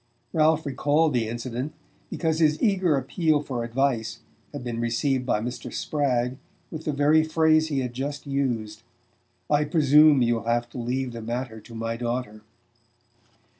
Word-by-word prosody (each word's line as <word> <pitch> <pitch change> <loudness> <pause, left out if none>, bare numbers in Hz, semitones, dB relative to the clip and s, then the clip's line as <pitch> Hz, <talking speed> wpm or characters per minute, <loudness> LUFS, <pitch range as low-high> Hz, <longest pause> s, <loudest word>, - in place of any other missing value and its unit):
Ralph 160 0 +3
recalled 145 +3 +1
the 115 -3 +1
incident 120 +4 -4 0.3
because 160 -1 -1
his 155 -2 +3
eager 190 - +2
appeal 155 +3 +1
for 125 -4 -3
advice 120 -1 -1 0.3
had - - -7
been 120 -2 -4
received 125 +3 0
by 105 - +1
Mr. 120 0 -5
Spragg 130 -3 -1 0.3
with 160 -1 -7
the 150 - 0
very 150 +2 +4
phrase 155 0 +3
he 140 -4 -1
had 125 -1 -4
just 140 +4 -4
used: 120 -6 -2 0.7
"I 150 0 +3
presume 150 -2 +5
you'll 115 -1 0
have 120 +1 0
to 125 - -7
leave 125 +2 -2
the 115 - -6
matter 120 0 -4
to 115 +2 -13
my 115 0 -3
daughter." 120 -2 -3
130 Hz, 155 wpm, -25 LUFS, 120-150 Hz, 0.7 s, presume